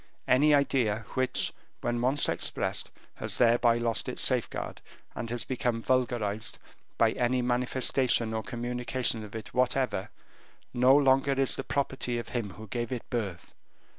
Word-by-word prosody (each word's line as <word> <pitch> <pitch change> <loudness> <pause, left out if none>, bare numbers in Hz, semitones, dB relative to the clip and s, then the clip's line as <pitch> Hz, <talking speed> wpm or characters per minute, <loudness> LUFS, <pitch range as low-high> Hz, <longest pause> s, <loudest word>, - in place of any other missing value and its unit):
Any 145 +4 +5
idea 125 -7 +2
which, 130 -1 0 0.3
when 120 0 -1
once 135 +4 +3
expressed, - - 0 0.3
has - - -2
thereby 120 0 +4
lost 120 -1 -1
its - - -2
safeguard, - - -1 0.3
and 115 - -5
has 120 0 -4
become 125 -3 -1
vulgarized 115 -4 -1 0.4
by - - +4
any 125 +1 0
manifestation 125 -1 +1
or 110 - -1
communication 120 -1 -1
of 105 0 -10
it 110 - -7
whatever, 125 -4 0 0.6
no 130 +2 +5
longer 135 0 +3
is 135 -1 +3
the - - -4
property 135 -3 -2
of 120 - -5
him 115 -5 -3
who 110 - -10
gave 120 +2 -4
it 125 -3 -4
birth. 100 -8 -4
120 Hz, 145 wpm, -29 LUFS, 115-130 Hz, 0.6 s, Any